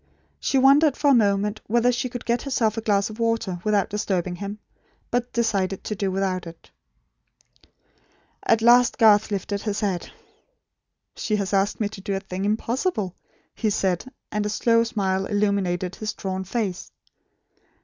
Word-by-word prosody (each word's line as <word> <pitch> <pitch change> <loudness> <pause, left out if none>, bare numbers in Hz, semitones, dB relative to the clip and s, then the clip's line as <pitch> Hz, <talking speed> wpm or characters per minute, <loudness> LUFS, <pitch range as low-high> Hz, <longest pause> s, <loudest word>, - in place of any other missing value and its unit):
She 275 - 0
wondered 275 +2 +5
for 290 -1 +3
a - - +6
moment 210 -2 +2
whether 240 +3 +3
she 245 +1 -2
could 245 -1 -7
get 235 0 +1
herself 235 -6 0
a 225 - -3
glass 205 -1 +1
of 215 - -11
water, 230 -6 0
without 210 -2 +1
disturbing 185 -4 -1
him; 200 +2 -5 0.5
but 245 0 -1
decided 200 -5 0
to 215 - -3
do 200 -1 -1
without 185 -2 -1
it. 165 0 -13 1.7
At 225 0 +2
last 245 +1 +5
Garth 215 -2 +5
lifted 200 0 -3
his 210 0 -2
head. 195 -4 -2 1.1
"She 215 - -1
has 200 -1 -2
asked 195 +1 +1
me 215 - +1
to 205 -2 -10
do 195 0 -2
a - - -1
thing 195 0 -5
impossible," 220 - -1 0.4
he 220 - -1
said; 190 -2 0 0.3
and 210 0 -1
a 210 - -2
slow 230 +2 +3
smile 195 -4 -1
illumined 195 -3 0
his 215 -1 -3
drawn 190 -1 -4
face. 195 -3 -3
210 Hz, 160 wpm, -24 LUFS, 195-230 Hz, 1.7 s, a